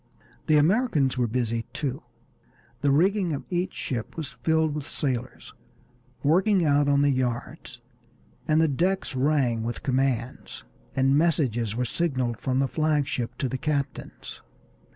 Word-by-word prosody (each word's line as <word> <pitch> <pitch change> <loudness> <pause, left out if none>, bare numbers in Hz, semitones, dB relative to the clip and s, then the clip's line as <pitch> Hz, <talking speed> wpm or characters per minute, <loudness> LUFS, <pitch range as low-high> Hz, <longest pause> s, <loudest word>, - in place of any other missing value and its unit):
The 155 - +5
Americans 155 - +2
were 125 -2 +1
busy 115 -1 -2
too. 140 0 -3 0.8
The 145 - +2
rigging 180 +4 +2
of 140 - -4
each 180 +1 -1
ship 120 +2 -4
was 155 -5 -3
filled 160 -1 0
with 150 -1 -5
sailors, 130 -3 -4 0.7
working 185 +4 +3
out 145 -1 +3
on 140 0 +4
the 145 - +4
yards, 125 -2 -3 0.7
the 160 +1 +4
decks 175 +2 0
rang 130 -4 +1
with 120 +2 -4
commands, 130 -2 -1 0.3
and 135 +1 +3
messages 130 -9 +1
were 125 +1 0
signaled 130 -5 -1
from 130 -1 -1
the 135 0 +2
flag 155 -1 +1
ship 120 -4 -3
to 135 - -1
the 130 +1 -4
captains. 145 -2 -4
140 Hz, 140 wpm, -26 LUFS, 125-155 Hz, 0.8 s, The